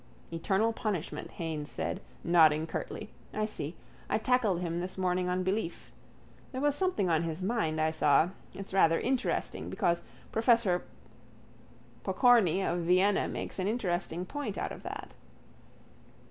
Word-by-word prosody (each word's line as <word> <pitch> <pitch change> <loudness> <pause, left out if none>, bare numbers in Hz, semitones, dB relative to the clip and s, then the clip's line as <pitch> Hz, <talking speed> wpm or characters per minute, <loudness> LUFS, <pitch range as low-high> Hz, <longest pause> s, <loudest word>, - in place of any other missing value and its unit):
—Eternal 195 +7 +1
punishment, 185 -10 -3
Haines 155 -3 -4
said, - - -3 0.2
nodding 160 -2 +5
curtly. 215 +5 -5 0.2
I 215 0 +1
see. 170 -7 -5 0.3
I - - +2
tackled 220 -6 +2
him 170 -1 -2
this 180 +2 -4
morning 180 -1 +1
on 180 0 0
belief. 190 -2 -2 0.6
There 260 - -4
was 290 +1 +2
something 325 - +1
on 165 -2 +3
his 165 0 -3
mind, 190 -7 0
I 155 0 +2
saw. 160 +1 +4 0.3
It's 195 -1 -7
rather 165 -4 +4
interesting 255 0 -1
because 170 0 +1 0.3
professor 225 -5 +3 1.2
Pokorny 210 - +4
of 175 - 0
Vienna 185 +4 +3
makes - - -4
an 185 - 0
interesting 180 -5 -1
point 250 -2 -4
out - - -2
of - - -8
that. - - -7
185 Hz, 140 wpm, -31 LUFS, 170-220 Hz, 1.2 s, nodding